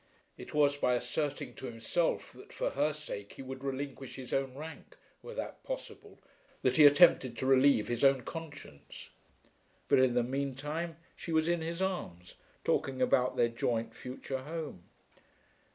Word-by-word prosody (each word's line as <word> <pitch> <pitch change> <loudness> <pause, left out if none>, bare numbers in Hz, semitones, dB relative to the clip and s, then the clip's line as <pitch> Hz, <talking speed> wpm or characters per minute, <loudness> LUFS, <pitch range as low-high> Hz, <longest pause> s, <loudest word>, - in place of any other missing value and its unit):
It - - -10
was 145 -1 +3
by 125 -3 +2
asserting 145 +3 -2
to 130 - -7
himself 115 +9 -1
that - - -14
for - - -2
her 145 +2 +1
sake 140 -9 -7
he - - -9
would 130 0 -7
relinquish 135 -1 -4
his 130 -2 -7
own 135 -1 0
rank, 155 +3 -9 0.2
were 485 - -9
that - - -5
possible, - - -7 0.5
that - - +3
he 150 -2 +10
attempted 145 -5 +5
to - - -2
relieve 130 -4 +5
his 120 +1 -2
own 135 -1 +5
conscience. 145 - -9 0.8
But, - - +5
in 130 -2 +4
the 120 - +3
mean 135 +2 -2
time, 155 +4 -4 0.2
she 170 - -7
was 160 0 +2
in 170 -1 +1
his 170 +3 -2
arms 90 - -4 0.3
talking 130 -1 0
about 125 0 +3
their 120 - +4
joint 115 -1 -1
future 130 +1 -5
home! 150 - -6
135 Hz, 165 wpm, -32 LUFS, 125-155 Hz, 0.8 s, he